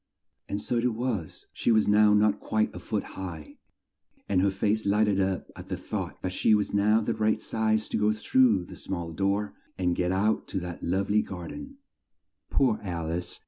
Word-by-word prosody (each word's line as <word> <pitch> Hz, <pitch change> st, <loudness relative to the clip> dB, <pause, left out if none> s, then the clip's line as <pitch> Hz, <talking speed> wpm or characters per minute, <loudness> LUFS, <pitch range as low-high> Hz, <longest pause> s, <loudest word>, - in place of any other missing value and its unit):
And 100 Hz, -, -2 dB
so 120 Hz, +3 st, -2 dB
it 120 Hz, -1 st, +1 dB
was; 115 Hz, -8 st, -3 dB
she -, -, +1 dB
was 110 Hz, -1 st, +4 dB
now 105 Hz, 0 st, +5 dB
not 105 Hz, 0 st, +3 dB
quite 110 Hz, 0 st, 0 dB
a -, -, -5 dB
foot 105 Hz, -3 st, -2 dB
high, 85 Hz, -5 st, -8 dB, 0.7 s
and 95 Hz, -2 st, +2 dB
her 100 Hz, -, +3 dB
face 105 Hz, +3 st, 0 dB
light 105 Hz, +2 st, +3 dB
ed 100 Hz, -2 st, +1 dB
up 95 Hz, -1 st, -1 dB
at -, -, -10 dB
the -, -, -3 dB
thought -, -, -5 dB
that 95 Hz, -, -1 dB
she 110 Hz, -, +4 dB
was 105 Hz, -1 st, -1 dB
now 105 Hz, +2 st, +4 dB
the 115 Hz, +1 st, -1 dB
right 110 Hz, 0 st, +1 dB
size 110 Hz, -1 st, 0 dB
to -, -, -1 dB
go 105 Hz, 0 st, +3 dB
through 110 Hz, -3 st, +3 dB
the -, -, -11 dB
small 85 Hz, -3 st, -5 dB
door 100 Hz, +3 st, 0 dB, 0.2 s
and 90 Hz, -2 st, +1 dB
get 90 Hz, 0 st, 0 dB
out 105 Hz, +4 st, +1 dB
to 95 Hz, -, -2 dB
that 90 Hz, -1 st, -6 dB
love 95 Hz, +4 st, -1 dB
ly 105 Hz, -, +4 dB
gar 90 Hz, -4 st, -7 dB
den. 275 Hz, -1 st, -9 dB, 0.7 s
Poor 125 Hz, -6 st, +2 dB
Al 85 Hz, -4 st, -3 dB
ice! 90 Hz, +1 st, -4 dB
105 Hz, 205 wpm, -27 LUFS, 95-110 Hz, 0.7 s, now